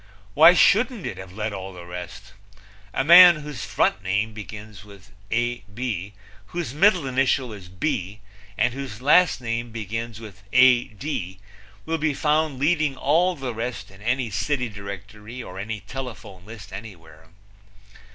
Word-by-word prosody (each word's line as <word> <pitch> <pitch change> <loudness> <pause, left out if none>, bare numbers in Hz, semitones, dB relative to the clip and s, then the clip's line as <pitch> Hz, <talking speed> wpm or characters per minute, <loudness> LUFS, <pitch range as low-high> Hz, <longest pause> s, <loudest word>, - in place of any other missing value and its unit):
Why 165 +4 +8
shouldn't 220 +2 +3
it 100 -7 -5
have 95 -1 -9
led 105 +2 -4
all 95 -1 -7
the 90 -1 -10
rest? 90 +3 -9 0.6
A 135 - 0
man 175 +3 +9
whose 145 -8 -7
front - - 0
name 100 +4 -1
begins 105 -1 -10
with 100 -1 -16 0.2
Ab, 120 -4 -3 0.4
whose 170 -7 -4
middle 180 0 +4
initial 130 -2 0
is 95 -4 -11
B, 100 - -3 0.4
and 120 +3 +2
whose 130 -5 -7
last 145 +2 +4
name 115 0 -3
begins 115 0 -5
with 105 -4 -12
Ad 125 -3 +4 0.8
will 165 0 -2
be 150 -2 0
found 150 -1 +1
leading 150 -1 +1
all 170 +7 +2
the 135 -5 -5
rest 115 -1 -5
in 95 +1 -17
any 120 +1 -1
city 125 +5 -1
directory 105 +4 -9
or 95 +1 -9
any 105 +1 -5
telephone 115 -8 -9
list 105 -4 -11
anywhere. 80 -6 -11
115 Hz, 145 wpm, -24 LUFS, 100-135 Hz, 0.8 s, man